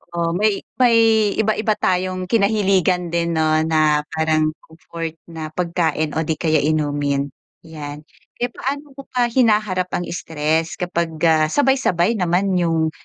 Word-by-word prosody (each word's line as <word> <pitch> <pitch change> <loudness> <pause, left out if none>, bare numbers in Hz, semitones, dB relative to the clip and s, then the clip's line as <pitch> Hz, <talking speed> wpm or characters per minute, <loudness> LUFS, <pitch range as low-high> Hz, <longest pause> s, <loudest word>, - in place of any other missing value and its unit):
Oo, 170 -1 0
may 210 0 +1 0.2
may 240 -2 +5 0.4
iba-iba 215 0 +1
tayong 185 0 -1
kinahiligan 195 -4 +2
din, 170 0 0
'no, 155 -1 +2
na 155 -2 +2
parang 155 -1 +1
comfort 165 0 -8
na 160 -2 -6
pagkain 170 -3 -1
o - - +2
'di 160 - -1
kaya 155 -1 +2
inumin. 145 -2 0 0.4
'Yan, 150 -2 -8 0.3
kaya 245 - -1
paano 280 +2 -5
mo 275 +1 -10
pa 250 -1 +1
hinaharap 210 -7 +2
ang 175 - -2
stress 160 -1 -1
kapag, 170 -2 -2
ah, 155 -1 +4
sabay-sabay 235 - +2
naman 180 +2 +1
yung 165 -2 +1
170 Hz, 140 wpm, -20 LUFS, 155-195 Hz, 0.4 s, may